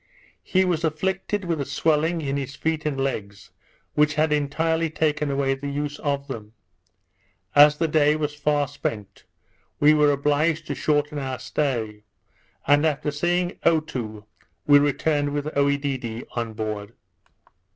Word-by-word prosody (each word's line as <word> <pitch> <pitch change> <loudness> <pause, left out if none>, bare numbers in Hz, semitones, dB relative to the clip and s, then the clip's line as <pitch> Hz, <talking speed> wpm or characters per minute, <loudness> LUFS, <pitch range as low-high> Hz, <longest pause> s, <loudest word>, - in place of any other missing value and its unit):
He 190 0 +2
was 170 -3 0
afflicted 190 +5 -1
with 165 -4 -1
a - - -2
swelling 160 +4 +1
in 140 -2 -2
his 135 -1 -4
feet 155 0 -1
and 140 -3 -2
legs, 100 -7 -4 0.4
which 150 0 +2
had 155 0 +2
entirely 160 +3 0
taken 150 -1 0
away 135 -1 +1
the 140 +1 -5
use 145 +1 -3
of 140 -1 -2
them. 110 -5 -7 1.0
As 150 +1 +7
the 165 - +1
day 150 -1 +3
was 150 -1 -2
far 150 -1 0
spent, 105 -5 -6 0.5
we 150 +1 +6
were 150 -1 +4
obliged 150 +3 +1
to - - -3
shorten 145 0 0
our 130 -2 -3
stay; 115 -9 -2 0.6
and 145 +1 +4
after 150 -1 0
seeing 175 +4 -1
Otoo, 125 -10 -1 0.4
we 145 -1 +7
returned 145 0 +1
with 145 +1 -3
Oedidee 140 -5 -1
on 115 -2 -3
board. 105 0 -5
145 Hz, 145 wpm, -24 LUFS, 135-155 Hz, 1.0 s, As